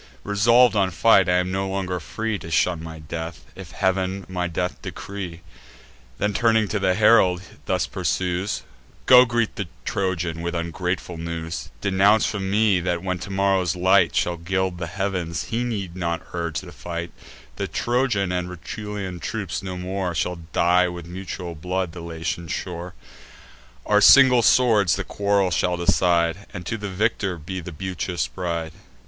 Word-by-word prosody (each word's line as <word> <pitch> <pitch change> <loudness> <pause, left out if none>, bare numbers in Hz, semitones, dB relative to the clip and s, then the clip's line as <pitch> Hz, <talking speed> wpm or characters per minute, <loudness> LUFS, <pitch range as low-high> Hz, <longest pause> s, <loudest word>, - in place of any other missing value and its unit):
Resolv'd 115 +4 +4
on 100 -2 +3
fight, 95 +1 +4
I 90 - +3
am 90 0 +1
no 95 0 -1
longer 95 -2 -2
free 110 +5 -3
To 80 - -9
shun 80 +1 +1
my 80 0 -8
death, 80 +2 -7
if - - -9
Heav'n 95 0 -1
my 90 -1 -2
death 90 +1 -3
decree." 95 -4 -7 0.8
Then 105 +1 0
turning 110 -1 +3
to 105 - -1
the 95 -1 +2
herald, 100 -4 +4 0.2
thus - - +1
pursues: 90 +2 -2 0.4
"Go, 125 0 +8
greet 120 -2 -1
the - - -3 0.2
Trojan 90 -4 -2
with 85 +1 -3
ungrateful 90 +1 -3
news; 85 +1 -5
Denounce 100 +3 +4
from 95 -2 -2
me, 105 -2 +3
that, 90 0 -2
when 90 -1 -2
tomorrow's 95 -3 +1
light 95 0 +3
Shall 85 0 +1
gild 95 +1 -1
the 85 - -3
heav'ns, 90 -2 -3
he 115 +2 -1
need 100 -7 -4
not 85 -2 -2
urge 85 -4 -2
the - - -11
fight; 85 0 -6 0.5
The - - -2
Trojan 120 -6 0
and 90 0 -2
Rutulian 95 0 -6
troops 105 0 -4
no 95 -2 -5
more 90 -1 -3
Shall 90 +2 -1
dye, 90 +1 +3
with 85 -1 -6
mutual 90 0 -6
blood, 90 +2 -3
the 85 +1 -9
Latian 85 0 -4
shore: 90 +2 -5 0.9
Our 105 0 +4
single 130 +2 +8
swords 110 -6 +4
the 95 - -3
quarrel 100 -2 +1
shall 90 +2 +1
decide, 85 +1 +2
And 90 - -7
to 115 - -2
the 105 -1 -4
victor 100 -1 0
be 95 +4 -6
the 90 0 -7
beauteous 90 -4 -3
bride." 85 +4 -3
90 Hz, 160 wpm, -23 LUFS, 85-100 Hz, 0.9 s, Go